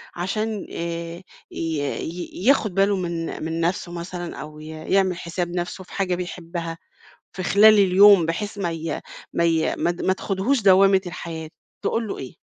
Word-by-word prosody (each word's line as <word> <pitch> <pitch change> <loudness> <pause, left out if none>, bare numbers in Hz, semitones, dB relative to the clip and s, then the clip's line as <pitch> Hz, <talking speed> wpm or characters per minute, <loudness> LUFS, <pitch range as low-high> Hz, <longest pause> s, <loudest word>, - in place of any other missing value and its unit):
عشان 210 +4 -2
آآ 170 +1 -5 0.3
ي - - -7 0.2
ي 175 +6 -5
ياخُد 230 -8 +4
باله 200 +1 +3
من 170 -4 -3
من 165 +1 -3
نفْسه 175 +1 -1
مثلًا 175 0 -6
أو 150 0 -9
ي 155 - -10
يعمل 180 +3 0
حساب 175 0 -3
نفْسه 175 +2 -3
في - - -16
حاجة 185 -3 0
بيحبها 170 -2 -5 0.6
في 185 - -5
خلال 215 +4 +7
اليوم، 195 -1 +7
بحيث 205 +5 -3
ما 175 -4 -1
ي 160 -2 -4 0.3
ما 170 - +1
ي 165 -1 +2
ما 175 - +1
ت 175 - -7
ما 190 - +2
تاخدهوش 205 +7 0
دوّامة 195 0 +6
الحياة، 165 -2 -6 0.3
تقول 225 -1 0
له - - -4
إيه؟ 130 - -8
175 Hz, 170 wpm, -23 LUFS, 165-195 Hz, 0.6 s, خلال